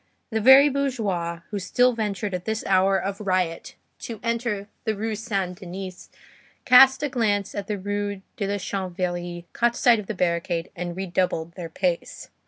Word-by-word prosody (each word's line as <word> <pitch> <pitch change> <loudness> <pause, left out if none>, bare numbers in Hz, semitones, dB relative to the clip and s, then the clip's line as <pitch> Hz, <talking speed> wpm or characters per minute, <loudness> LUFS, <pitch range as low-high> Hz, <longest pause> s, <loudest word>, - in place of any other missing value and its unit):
The 220 0 0
very 265 +5 +8
bourgeois 210 - -1
who 205 - -2
still 245 +6 +2
ventured 210 -3 -3
at 180 -1 -4
this 220 0 -2
hour 190 0 +3
of 195 +2 -4
riot 185 -4 -1 0.2
to 230 -3 -7
enter 230 -3 -2 0.2
the 220 -1 -1
Rue 220 +2 -2
Saint 195 -5 -3
Denis 185 0 -8 0.6
cast 265 +2 +7
a - - +2
glance 210 -6 0
at 200 -1 -5
the 210 - -2
Rue 205 0 -3
de 200 - -2
la 200 +1 -1
Chanvrerie, 175 -2 -4
caught 235 0 +1
sight 240 -3 +5
of 205 - -8
the 220 - -4
barricade, 170 -1 -1
and 175 0 -5
redoubled 180 -3 -1
their 170 -1 -7
pace. 175 0 -3
200 Hz, 170 wpm, -24 LUFS, 180-220 Hz, 0.6 s, very